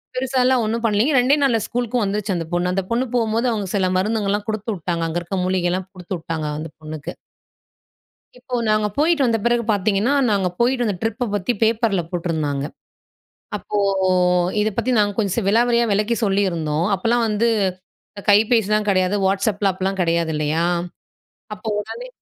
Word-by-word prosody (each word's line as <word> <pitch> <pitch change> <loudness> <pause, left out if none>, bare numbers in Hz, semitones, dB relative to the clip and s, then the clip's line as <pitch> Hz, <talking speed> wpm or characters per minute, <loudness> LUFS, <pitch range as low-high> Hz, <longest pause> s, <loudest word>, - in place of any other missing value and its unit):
பெருசாலாம் 255 -1 +2
ஒண்ணும் 225 +2 -2
பண்ணலிங்க, 220 +7 +2
2டே 255 +4 +4
நாள்ல 245 -5 +3
ஸ்கூல்‌க்கும் 245 -1 -1
வந்துச்சு 200 0 -1
அந்த 165 -1 -3
பொண்ணு 175 +1 +1
அந்த 195 0 0
பொண்ணு 240 +3 +1
போம்போது 230 +1 +1
அவங்க 210 -4 -2
சில 190 -2 +2
மருந்துகல்லாம் 205 0 0
குடுத்துவுட்டாங்க. 190 -6 -3
அங்க 165 +2 -2
இருக்க 190 +3 -4
மூலிகைல்லாம் 185 0 0
குடுத்துவுட்டாங்க 165 -4 -4
அந்த 160 0 -6
பொண்ணுக்கு. 155 -1 -7 1.3
இப்போ 250 0 -5
நாங்க 215 0 +2
போயிட்டு 310 -1 +3
வந்த 230 -2 +2
பிறகு 240 0 +2
பாத்தீங்கன்னா, 205 +5 +1 0.2
நாங்க 195 -3 +1
போயிட்டு 245 0 +2
அந்த 205 -3 -1
ட்ரிப்ப 225 +3 -1
பத்தி 205 +5 0
பேப்பர்ல 220 -4 +2
போட்டுருந்தாங்க. 160 -5 -2 0.9
அப்போ - - -5 0.8
இத 215 - +2
பத்தி 235 +2 0
நாங்க 205 -1 +2
கொஞ்சம் 200 -2 0
ஸ் 230 - 0
விலாவரியா 235 +2 +3
விலக்கி 210 +4 +1
சொல்லியிருந்தோம். 170 -5 0
அப்போலாம் 230 +5 +1
வந்து 215 +2 +1 0.6
இந்த 200 -2 -10
கைபேசிலாம் 215 0 +3
கிடையாது. 185 +1 +2
Whatsappலாம் 195 0 +1
அப்பலாம் 190 +1 -2
கிடையாது, 170 -1 +1
இல்லயா? 155 +3 0 0.9
அப்போ 210 +2 -8
உடனே 470 - -7
205 Hz, 150 wpm, -21 LUFS, 185-230 Hz, 1.3 s, 2டே